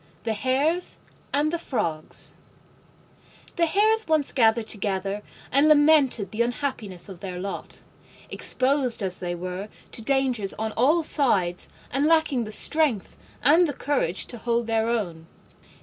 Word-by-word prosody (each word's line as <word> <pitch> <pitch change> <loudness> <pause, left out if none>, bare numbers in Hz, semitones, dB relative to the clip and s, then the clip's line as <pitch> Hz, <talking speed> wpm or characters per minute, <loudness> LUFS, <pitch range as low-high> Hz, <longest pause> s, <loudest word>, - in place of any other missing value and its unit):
THE 225 - -1
HARES 280 +10 0 0.3
AND 295 +3 +1
THE 340 - -1
FROGS 165 - -2 1.2
The 335 -1 +2
Hares 435 +5 +2
once 310 -3 +2
gathered 225 -2 +3
together 200 -1 -2 0.3
and 280 +3 +4
lamented 290 - +4
the 220 - -2
unhappiness 235 -7 -3
of 190 -4 -10
their 185 -2 -6
lot, 195 +2 -6 0.5
exposed 260 -4 0
as 185 -1 -2
they 175 -1 -3
were 180 +3 -6 0.2
to - - -3
dangers 250 -5 0
on 220 0 -3
all 295 +10 +2
sides 195 - +1 0.2
and 275 +3 +1
lacking 310 -7 +2
the 215 - -7
strength 280 -4 +2 0.3
and 330 +4 +5
the 290 - -3
courage 255 - -1
to 240 - -7
hold 235 +1 0
their 225 0 0
own. 175 -9 -3
235 Hz, 140 wpm, -25 LUFS, 200-290 Hz, 1.2 s, and